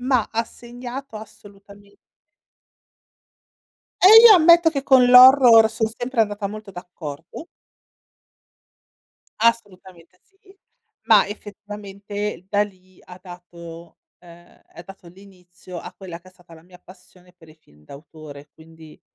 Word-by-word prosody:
ma 250 -3 -2
ha 230 +1 -3
segnato 245 +1 -12
assolutame 200 -1 -17 2.1
Eh, 435 +5 +8
io 425 - +7
ammetto 340 0 +4
che 280 -4 -5
con 265 -2 +3
l'horror 250 -3 +6
son 220 0 -4
sempre 245 -1 -4
andata 205 -1 -3
molto 210 0 -11
d'accordo. 175 - -12 1.9
Assolutamente 185 -6 -4
sì. 390 0 -27 0.5
Ma - - +3
effettivamente 205 -1 -10
da 205 0 -1
lì 185 -2 -14
ha 180 0 -15
dato, 170 -2 -15 0.2
ehm, 175 0 -21
ha - - -13
dato 190 0 -17
l'inizio 180 -1 -16
a - - -12
quella 180 -3 -12
che 185 - -21
è - - -20
stata 180 -2 -21
la 160 - -19
mia 180 +1 -20
passione 180 -1 -21
per 170 -3 -23
i 155 - -19
film 75 - -28
d'autore, 145 - -15
quindi, 160 -1 -19
195 Hz, 125 wpm, -19 LUFS, 175-230 Hz, 2.1 s, Eh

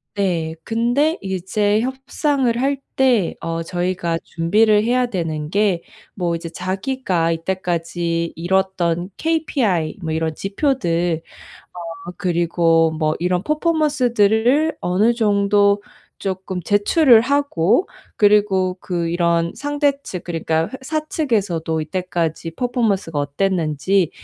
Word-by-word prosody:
네. 170 -5 -1
근데 245 +8 +1
이게 190 -1 -3
제 210 +2 +1
협상을 265 0 -1
할 275 +1 +1 0.2
때 245 -9 +2
어 165 0 -3
저희가 175 -1 -2
준비를 210 +6 +2
해야 245 +2 +2
되는 160 -7 -3
게 200 -3 +1 0.3
뭐 175 -3 -1
이제 165 0 -6
자기가 185 -1 -1
이때까지 170 -1 -2
이뤘던 180 0 0
KPI 255 - 0
뭐 160 - -2
이런 160 0 -1
지표들 175 - 0 0.9
어 180 - -5
그리고 170 -2 +2
뭐 155 -1 0
이런 180 +1 0
퍼포먼스들을 290 -4 +2
어느 200 +7 +2
정도 205 -2 +3 0.4
쪼끔 185 -1 -4
제출을 220 - +5
하고 275 - +2 0.3
그리고 205 -3 +3
그 170 -2 -2
이런 170 -1 +1
상대측 285 - -2
그러니까 165 -1 -1
회 - - -20
사측에서도 225 - -1
이때까지 165 -1 -3
퍼포먼스가 205 - -1
어땠는지 165 +3 0
190 Hz, 250 characters per minute, -20 LUFS, 170-235 Hz, 0.9 s, 제출을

